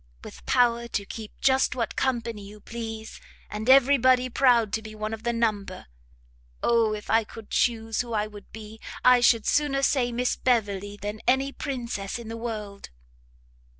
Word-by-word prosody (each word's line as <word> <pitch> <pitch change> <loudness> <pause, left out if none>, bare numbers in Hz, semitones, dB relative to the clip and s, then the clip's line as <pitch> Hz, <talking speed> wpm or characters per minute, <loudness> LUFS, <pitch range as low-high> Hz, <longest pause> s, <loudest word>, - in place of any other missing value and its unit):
with - - -11
power 235 -1 +2
to 200 -3 -3
keep 215 +1 -8
just 265 -1 +3
what 235 -2 -2
company 235 -4 -1
you 205 +1 -12
please, 225 0 -7 0.3
and 215 +3 -4
every 275 +1 +6
body 255 0 +3
proud 235 -4 +3
to 220 - 0
be 215 0 -10
one 215 +1 -4
of 220 - -6
the 235 +1 -1
number! 215 -5 -2 0.8
Oh 230 -2 +3
if 210 0 -7
I 225 0 +4
could 215 0 -12
chuse 225 -2 +1
who 240 -1 -8
I 210 -2 0
would 210 -1 -12
be, 220 0 -10 0.3
I 250 0 +7
should 235 -2 +4
sooner 285 -2 +1
say 255 -3 +2
Miss 245 +1 0
Beverley 205 -5 0
than 210 +1 -6
any 265 +2 +2
princess 240 -9 -4
in 235 -2 -9
the 225 - -5
world!" 215 -4 -6
230 Hz, 175 wpm, -26 LUFS, 215-245 Hz, 0.8 s, I